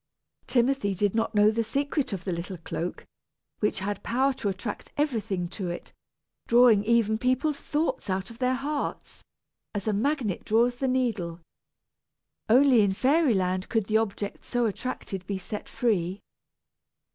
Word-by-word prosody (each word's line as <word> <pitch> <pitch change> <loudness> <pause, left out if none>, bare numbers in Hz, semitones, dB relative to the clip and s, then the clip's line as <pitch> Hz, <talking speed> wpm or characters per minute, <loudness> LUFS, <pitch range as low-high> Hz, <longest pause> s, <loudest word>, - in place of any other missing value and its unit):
Timothy 245 -5 +2
did 205 +1 +1
not 225 0 0
know 210 +1 +6
the 230 +1 0
secret 280 +4 -1
of 190 -3 -4
the 190 - -2
little 175 +2 -4
cloak, 170 +1 -5 0.5
which 210 -2 0
had 200 0 -3
power 265 +3 +1
to 240 -6 -2
attract 195 +3 -5
everything 220 - -1
to 185 -1 -4
it, 175 - -7 0.5
drawing 235 -3 +6
even 220 -1 +3
people's 260 +4 +1
thoughts 300 -7 -2
out 190 +3 -2
of 230 - -13
their 255 0 +2
hearts, 285 +2 -4 0.5
as 205 +1 -3
a 215 - +2
magnet 235 - 0
draws 240 +3 +2
the 265 - -1
needle. 225 -10 -1 1.1
Only 255 0 +6
in 200 -2 +2
fairy 270 +3 +3
land 185 0 -1
could 225 -3 +1
the 215 +2 +2
objects 205 -2 -3
so 245 -1 +1
attracted 200 -4 -4
be 200 - -2
set 205 +3 -7
free. 195 -5 0
220 Hz, 155 wpm, -27 LUFS, 195-255 Hz, 1.1 s, know